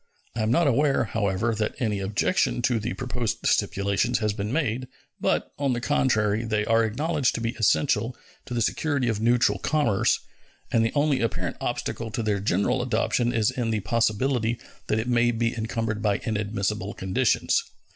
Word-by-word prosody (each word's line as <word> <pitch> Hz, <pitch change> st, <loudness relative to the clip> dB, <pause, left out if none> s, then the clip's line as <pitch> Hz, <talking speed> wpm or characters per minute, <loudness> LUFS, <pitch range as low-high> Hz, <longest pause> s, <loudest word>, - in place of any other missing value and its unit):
I 115 Hz, -, -1 dB
am 110 Hz, -, +1 dB
not 150 Hz, +9 st, +3 dB
aware, 140 Hz, +1 st, +3 dB
however, 110 Hz, 0 st, 0 dB
that 110 Hz, 0 st, -2 dB
any 105 Hz, -5 st, 0 dB
objection 105 Hz, -, 0 dB
to 120 Hz, -2 st, +2 dB
the 110 Hz, +3 st, -3 dB
proposed 125 Hz, -3 st, -3 dB
stipulations 100 Hz, +5 st, +1 dB
has 105 Hz, -2 st, 0 dB
been 105 Hz, +1 st, -3 dB
made, 130 Hz, -4 st, -1 dB, 0.3 s
but, -, -, 0 dB
on 140 Hz, -3 st, +1 dB
the 120 Hz, -, -1 dB
contrary, 115 Hz, -5 st, +1 dB
they 110 Hz, -2 st, 0 dB
are 115 Hz, +1 st, +3 dB
acknowledged 145 Hz, +5 st, 0 dB
to -, -, -3 dB
be 115 Hz, 0 st, 0 dB
essential 115 Hz, +1 st, +2 dB, 0.3 s
to 125 Hz, -, -4 dB
the 115 Hz, -, +2 dB
security 140 Hz, 0 st, 0 dB
of 110 Hz, -2 st, -1 dB
neutral 120 Hz, +1 st, +3 dB
commerce, 120 Hz, -11 st, +2 dB, 0.5 s
and 115 Hz, -, +3 dB
the 115 Hz, -, +1 dB
only 145 Hz, -1 st, +2 dB
apparent 115 Hz, -3 st, -2 dB
obstacle 115 Hz, -1 st, -3 dB
to 115 Hz, +1 st, -3 dB
their 105 Hz, -2 st, 0 dB
general 100 Hz, +5 st, +1 dB
adoption 120 Hz, 0 st, +1 dB
is 115 Hz, -3 st, +2 dB
in 120 Hz, -3 st, -2 dB
the 110 Hz, -2 st, 0 dB
possibility 115 Hz, +2 st, +1 dB, 0.3 s
that 110 Hz, -, +1 dB
it 110 Hz, +2 st, -2 dB
may 120 Hz, -1 st, +3 dB
be 115 Hz, 0 st, 0 dB
encumbered 110 Hz, -1 st, -2 dB
by 105 Hz, -2 st, +2 dB
inadmissible 105 Hz, -2 st, -2 dB
conditions. 95 Hz, 0 st, +1 dB
115 Hz, 175 wpm, -25 LUFS, 105-125 Hz, 0.5 s, not